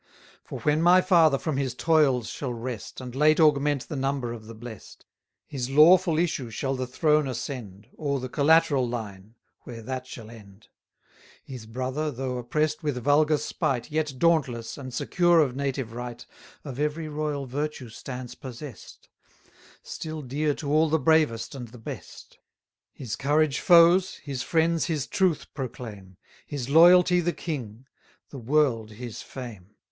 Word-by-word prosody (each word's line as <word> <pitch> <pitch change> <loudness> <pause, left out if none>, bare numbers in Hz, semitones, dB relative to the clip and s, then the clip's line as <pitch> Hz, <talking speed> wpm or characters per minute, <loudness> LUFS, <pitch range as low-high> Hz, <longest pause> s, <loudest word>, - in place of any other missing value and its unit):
For - - -8
when 150 +1 +2
my 175 +2 +6
father 165 -6 +4
from 155 -1 -3
his 130 -3 -2
toils 140 -7 +2
shall 135 -4 -4
rest, 115 -1 -6
And 125 -1 -8
late 155 +4 +3
augment 145 -3 +3
the 155 - -5
number 135 -3 -2
of 110 -2 -10
the 115 - -9
blest, 110 -2 -11 0.5
350 140 - -6
His 135 - -4
lawful 170 +1 +6
issue 155 -7 -1
shall 135 +5 -2
the 130 -1 -3
throne 150 +3 +2
ascend, 115 -6 -6
Or 140 -3 -2
the 130 - -5
collateral 145 -2 +3
line, 110 -2 -7 0.2
where 115 -2 -10
that 130 +1 -5
shall 115 -3 -10
end. 105 -2 -15 0.7
His 125 -5 -9
brother, 130 +6 -3
though 130 -2 -4
oppress'd 150 +6 -1
with 145 -5 -2
vulgar 150 +2 +4
spite, 145 -3 -2
Yet 150 -3 -1
dauntless, 135 -8 +1
and 130 -2 -8
secure 175 +7 +2
of 135 -5 +2
native 135 -4 -3
right, 120 0 -7 0.4
Of 135 -2 -7
every 150 +2 -1
royal 150 -2 -3
virtue 140 -1 -4
stands 125 +2 -8
possess'd; 130 -2 -10 0.8
Still 155 -1 -6
dear 145 +3 -1
to 145 -2 -4
all 155 +1 +4
the 160 - +3
bravest 150 -6 +2
and 125 -3 -7
the 120 +2 -14
best. 110 - -10 0.5
His 125 -6 -6
courage 145 0 +1
foes 175 +1 +5
his 140 -4 -6
friends 165 +2 +1
his 155 -5 -2
truth 185 -5 0
proclaim; 110 - -8 0.3
His 135 -3 -5
loyalty 180 +3 +7
the 175 0 -1
king 125 -7 -6 0.5
the 140 - -7
world 120 -4 +1
his 120 +1 -8
fame. 105 -6 -10
140 Hz, 155 wpm, -26 LUFS, 120-155 Hz, 0.8 s, loyalty